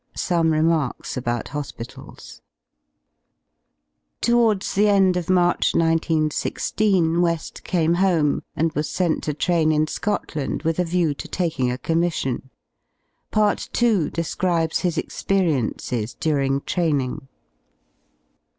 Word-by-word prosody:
§Some 170 Hz, -3 st, +1 dB
remarks 155 Hz, -3 st, 0 dB
about 120 Hz, -2 st, -2 dB
hospitalsi 140 Hz, -4 st, -8 dB, 1.8 s
Towards 230 Hz, -4 st, +2 dB
the 205 Hz, +2 st, +3 dB
end 195 Hz, -3 st, +4 dB
of 180 Hz, 0 st, -3 dB
March 175 Hz, -1 st, +2 dB
1 -, -, +4 dB, 0.2 s
9 160 Hz, -2 st, 0 dB
1 155 Hz, -, 0 dB
6 -, -, -3 dB
WeH 170 Hz, -5 st, +1 dB
came 170 Hz, -2 st, +1 dB
home, 175 Hz, -5 st, +2 dB
and 160 Hz, +1 st, 0 dB
was 150 Hz, 0 st, -2 dB
sent 175 Hz, -3 st, 0 dB
to 150 Hz, -, -1 dB
tram 165 Hz, -1 st, +2 dB
m 155 Hz, 0 st, +2 dB
Scotland 155 Hz, -5 st, -3 dB
with 165 Hz, +1 st, 0 dB
a -, -, +3 dB
view 170 Hz, -3 st, +1 dB
to -, -, -8 dB
taking 160 Hz, -8 st, -1 dB
a 125 Hz, -, -3 dB
commission. 160 Hz, -5 st, -1 dB, 0.8 s
Part 210 Hz, -1 st, +1 dB
II. 215 Hz, -9 st, +3 dB
describes 165 Hz, 0 st, -1 dB
his 175 Hz, -3 st, -1 dB
experiences 130 Hz, -, -1 dB
during 140 Hz, -3 st, 0 dB
training. 145 Hz, -7 st, -1 dB
165 Hz, 120 wpm, -22 LUFS, 150-180 Hz, 1.8 s, end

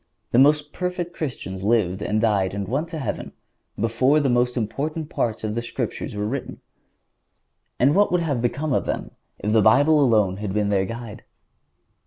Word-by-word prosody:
The 120 Hz, -, +4 dB
most 150 Hz, +2 st, +4 dB
perfect 180 Hz, -1 st, -3 dB
Christians 95 Hz, -, -5 dB
lived 100 Hz, -3 st, +1 dB
and 105 Hz, +1 st, 0 dB
died 100 Hz, -4 st, +1 dB
and 100 Hz, -1 st, -3 dB
went 140 Hz, +8 st, -1 dB
to 165 Hz, -1 st, -6 dB
heaven 140 Hz, -, -4 dB, 0.5 s
before 115 Hz, +7 st, +3 dB
the 140 Hz, -3 st, +1 dB
most 125 Hz, +1 st, +1 dB
important 150 Hz, +7 st, -3 dB
parts 110 Hz, -2 st, -2 dB
of 110 Hz, -1 st, -2 dB
the 120 Hz, -, -2 dB
Scriptures 120 Hz, -, -4 dB
were 105 Hz, 0 st, -2 dB
written. 130 Hz, +5 st, -4 dB, 1.2 s
And 135 Hz, +4 st, +4 dB
what 205 Hz, +3 st, +3 dB
would 180 Hz, -1 st, +2 dB
have 145 Hz, -7 st, -1 dB
become 135 Hz, +5 st, -1 dB
of -, -, +1 dB
them -, -, -3 dB, 0.3 s
if 105 Hz, +1 st, -2 dB
the 110 Hz, -, +5 dB
Bible 145 Hz, +8 st, +5 dB
alone 105 Hz, -7 st, +3 dB
had 100 Hz, -1 st, -4 dB
been 105 Hz, -1 st, +1 dB
their 95 Hz, -2 st, +2 dB
guide? 115 Hz, +1 st, -7 dB
120 Hz, 180 wpm, -23 LUFS, 105-150 Hz, 1.2 s, the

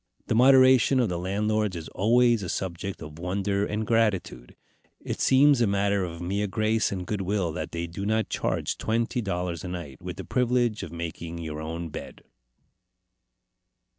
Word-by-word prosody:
The -, -, -1 dB
moderation 130 Hz, +1 st, +6 dB
of 120 Hz, -, +2 dB
the 85 Hz, -1 st, -2 dB
landlords 105 Hz, +2 st, 0 dB
is 80 Hz, -2 st, -6 dB
always 120 Hz, +2 st, +3 dB
a 90 Hz, -, -5 dB
subject 95 Hz, 0 st, -4 dB
of 75 Hz, +1 st, -10 dB
wonder 100 Hz, +3 st, -1 dB
and 105 Hz, +1 st, -2 dB
gratitude. 105 Hz, -, 0 dB, 0.4 s
It -, -, -5 dB
seems 135 Hz, 0 st, +5 dB
a 115 Hz, -, +4 dB
matter 100 Hz, 0 st, +1 dB
of 85 Hz, -1 st, -6 dB
mere 100 Hz, +4 st, -1 dB
grace 110 Hz, +2 st, +1 dB
and 90 Hz, -2 st, -4 dB
good 105 Hz, 0 st, -2 dB
will 95 Hz, -3 st, -1 dB
that 85 Hz, -, -5 dB
they 85 Hz, 0 st, -3 dB
do 85 Hz, +4 st, -6 dB
not 110 Hz, +2 st, +1 dB
charge -, -, -2 dB
twenty 115 Hz, +2 st, 0 dB
dollars 90 Hz, -4 st, -3 dB
a -, -, -5 dB
night, 85 Hz, -7 st, -7 dB
with 90 Hz, 0 st, -6 dB
the 95 Hz, -, -6 dB
privilege 120 Hz, -3 st, +1 dB
of 80 Hz, -, -7 dB
making 85 Hz, 0 st, -6 dB
your 80 Hz, -2 st, -5 dB
own 85 Hz, +1 st, -5 dB
bed. -, -, -9 dB
100 Hz, 170 wpm, -26 LUFS, 85-110 Hz, 0.4 s, moderation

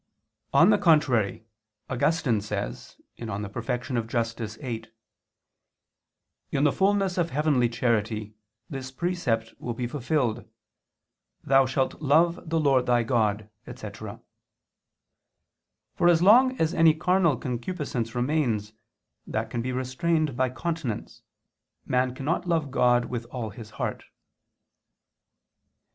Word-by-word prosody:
On 165 Hz, +9 st, +6 dB
the 205 Hz, -, +3 dB
contrary, 140 Hz, -, +2 dB, 0.4 s
Augustine 130 Hz, -4 st, +1 dB
says 100 Hz, -1 st, -5 dB, 0.2 s
(De 105 Hz, -3 st, -5 dB
Perfect. 120 Hz, +3 st, -3 dB, 0.2 s
Justit. 115 Hz, -2 st, -3 dB
viii): 115 Hz, -5 st, -5 dB, 1.6 s
"In 140 Hz, -, 0 dB
the 145 Hz, -, +4 dB
fulness 195 Hz, 0 st, +1 dB
of 170 Hz, -1 st, +1 dB
heavenly 140 Hz, -5 st, +2 dB
charity 110 Hz, -2 st, -1 dB, 0.3 s
this 130 Hz, -1 st, -6 dB
precept 130 Hz, -8 st, -1 dB
will 120 Hz, -2 st, -4 dB
be 125 Hz, -, -3 dB
fulfilled: 125 Hz, -2 st, -1 dB, 1.0 s
Thou 135 Hz, 0 st, +4 dB
shalt 130 Hz, +2 st, -1 dB
love 160 Hz, +3 st, +2 dB
the 165 Hz, 0 st, +1 dB
Lord 135 Hz, -4 st, +3 dB
thy 120 Hz, -1 st, +3 dB
God," 110 Hz, -3 st, 0 dB, 0.2 s
etc. 110 Hz, -4 st, -8 dB, 1.7 s
For 175 Hz, -, +2 dB
as 170 Hz, 0 st, +4 dB
long 255 Hz, +6 st, +6 dB
as 160 Hz, +1 st, +1 dB
any 165 Hz, -2 st, +5 dB
carnal 175 Hz, -2 st, +2 dB
concupiscence 125 Hz, -3 st, -4 dB
remains, 120 Hz, -6 st, 0 dB, 0.5 s
that 110 Hz, 0 st, -3 dB
can 120 Hz, -, -2 dB
be 130 Hz, +2 st, -3 dB
restrained 140 Hz, +4 st, 0 dB
by 130 Hz, +1 st, +1 dB
continence, 145 Hz, -4 st, -4 dB, 0.6 s
man 125 Hz, 0 st, 0 dB
cannot 165 Hz, +7 st, -2 dB
love 160 Hz, -5 st, 0 dB
God 120 Hz, -2 st, +3 dB
with 120 Hz, -2 st, -5 dB
all 120 Hz, -3 st, -5 dB
his 105 Hz, +1 st, -10 dB
heart. -, -, -3 dB
130 Hz, 115 wpm, -26 LUFS, 115-160 Hz, 1.7 s, On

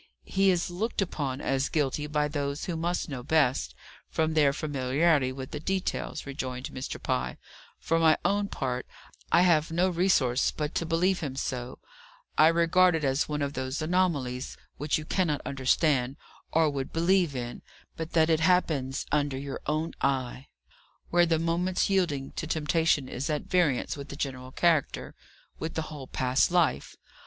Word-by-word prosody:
"He 195 Hz, 0 st, +2 dB
is 175 Hz, -1 st, +1 dB
looked 210 Hz, +7 st, -3 dB
upon 145 Hz, -8 st, -2 dB
as 135 Hz, +1 st, 0 dB
guilty 150 Hz, -1 st, 0 dB
by 150 Hz, 0 st, +1 dB
those 145 Hz, -1 st, -3 dB
who 175 Hz, -, -3 dB
must 170 Hz, +2 st, -1 dB
know 135 Hz, -5 st, -5 dB
best, 125 Hz, -, +1 dB, 0.3 s
from 160 Hz, 0 st, 0 dB
their 150 Hz, -3 st, +4 dB
familiarity 140 Hz, 0 st, +1 dB
with 130 Hz, 0 st, -7 dB
the 150 Hz, -, -4 dB
details," 185 Hz, -1 st, -2 dB
rejoined 130 Hz, -2 st, -5 dB
Mr. 130 Hz, -, -5 dB
Pye, 65 Hz, 0 st, -2 dB, 0.4 s
"For 165 Hz, 0 st, +1 dB
my 160 Hz, -1 st, +5 dB
own 205 Hz, 0 st, +2 dB
part, 130 Hz, -7 st, -3 dB, 0.4 s
I 175 Hz, -, +6 dB
have 165 Hz, -3 st, +3 dB
no 175 Hz, +3 st, +2 dB
resource 165 Hz, -9 st, +2 dB
but 150 Hz, 0 st, -3 dB
to 165 Hz, -, -1 dB
believe 180 Hz, +3 st, +2 dB
him 140 Hz, -5 st, -4 dB
so, 125 Hz, -2 st, -4 dB, 0.6 s
I 155 Hz, -, +7 dB
regard 170 Hz, +2 st, +4 dB
it 160 Hz, -, -2 dB
as 135 Hz, +2 st, +1 dB
one 150 Hz, -1 st, -1 dB
of 140 Hz, 0 st, -2 dB
those 130 Hz, +1 st, -3 dB
anomalies 155 Hz, -7 st, 0 dB, 0.2 s
which 150 Hz, +1 st, 0 dB
you 155 Hz, -, -6 dB
cannot 160 Hz, -4 st, 0 dB
understand, 135 Hz, -1 st, +1 dB, 0.4 s
or 160 Hz, 0 st, +4 dB
would 140 Hz, -2 st, -3 dB
believe 170 Hz, -2 st, +2 dB
in, 120 Hz, -1 st, -5 dB, 0.3 s
but 160 Hz, 0 st, -6 dB
that 160 Hz, -1 st, +4 dB
it 160 Hz, -, +3 dB
happens 155 Hz, -6 st, +1 dB
under 145 Hz, -2 st, +1 dB
your 140 Hz, 0 st, -5 dB
own 155 Hz, +2 st, -1 dB
eye; 130 Hz, -1 st, -1 dB, 0.6 s
where 175 Hz, 0 st, +4 dB
the 165 Hz, -1 st, +2 dB
moment's 175 Hz, +4 st, 0 dB
yielding 155 Hz, -8 st, 0 dB
to 160 Hz, -, -3 dB
temptation 155 Hz, -2 st, +1 dB
is 130 Hz, +5 st, -4 dB
at 150 Hz, -1 st, -1 dB
variance 165 Hz, -9 st, +1 dB
with 140 Hz, 0 st, -8 dB
the -, -, -6 dB
general 130 Hz, -3 st, -4 dB
character, 165 Hz, -1 st, +1 dB, 0.5 s
with 160 Hz, +1 st, -4 dB
the 160 Hz, -, 0 dB
whole 140 Hz, -3 st, -8 dB
past 130 Hz, +1 st, +2 dB
life. 170 Hz, -6 st, +1 dB
150 Hz, 165 wpm, -28 LUFS, 135-165 Hz, 0.6 s, I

